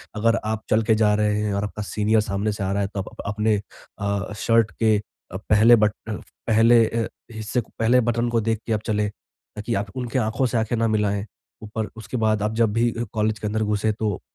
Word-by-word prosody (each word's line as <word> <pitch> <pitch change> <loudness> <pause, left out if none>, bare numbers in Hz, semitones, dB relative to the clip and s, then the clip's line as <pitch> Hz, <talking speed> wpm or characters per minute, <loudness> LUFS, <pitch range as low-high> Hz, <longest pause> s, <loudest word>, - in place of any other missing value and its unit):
अगर 115 +2 +2
आप 110 0 -2
चल 110 +1 +4
के 110 0 +3
जा 105 -1 +3
रहे 105 0 +1
हैं 105 - -1
और 100 - -1
आपका 105 +1 -5
सीनियर 105 +1 +1
सामने 100 +1 -1
से 100 - -4
आ 95 - -1
रहा 100 - 0
है 100 - 0
तो 100 - -3
आप - - -9
अपने 105 +1 +1 0.4
अ, 100 0 -2
शर्ट 115 -1 +2
के 110 -2 +4
अ, 95 -2 -10
पहले 110 +3 +5
बट 105 -1 +3 0.2
अ, - - -2 0.3
पहले 115 +1 +5
अ, 115 -1 -1 0.2
हिस्से 110 +3 -2
को - - -18
पहले 120 +3 +4
बटन 120 0 0
को 115 -1 +1
देख 110 0 0
के 115 - +1
आप 105 - -1
चले, 105 -1 0
ताकि 105 +2 -8
आप 100 +1 -2
उनके 125 0 -2
आँखों 110 +3 0
से 120 - -1
आँखें 110 +1 0
ना 115 0 +2
मिलाएँ, 105 -2 0 0.4
ऊपर 110 0 -4
उसके 110 +3 -5
बाद 110 -2 +1
आप 105 - -1
जब 115 -3 +2
भी 115 +1 +2 0.2
कॉलेज 110 -1 0
के 105 - -3
अंदर 110 +1 -1
घुसे 105 +1 +1
तो 105 -3 -2
110 Hz, 230 wpm, -23 LUFS, 105-115 Hz, 0.4 s, पहले